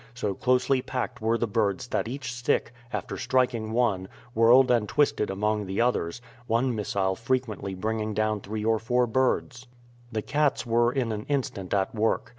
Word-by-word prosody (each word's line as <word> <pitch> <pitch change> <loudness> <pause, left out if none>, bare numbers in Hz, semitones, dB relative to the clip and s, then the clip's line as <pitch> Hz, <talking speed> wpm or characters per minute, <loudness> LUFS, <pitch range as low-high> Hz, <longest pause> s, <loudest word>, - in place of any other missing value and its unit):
So 105 -5 -1
closely 130 +4 +2
packed 125 -3 -4
were 115 +1 +2
the 120 - 0
birds 105 0 0
that - - -1
each 130 0 -5
stick, 120 0 0 0.2
after - - -4
striking 125 -4 +1
one, 110 -6 +1 0.3
whirled 120 +3 +6
and 115 -4 +2
twisted 140 -7 +2
among 105 +1 -1
the 95 +1 -3
others, 120 -3 0 0.2
one 120 +3 +1
missile 100 -2 0
frequently 115 -4 -2
bringing 110 +2 -2
down 110 -1 0
three 105 +2 -4
or 110 -1 +2
four 125 +2 +2
birds. 130 +1 0 0.4
The 110 -1 -2
cats 145 -4 +1
were 120 +1 +3
in 125 -3 -1
an 105 0 -4
instant 120 -9 -2
at 95 -1 0
work. 110 0 0
115 Hz, 170 wpm, -27 LUFS, 105-125 Hz, 0.4 s, whirled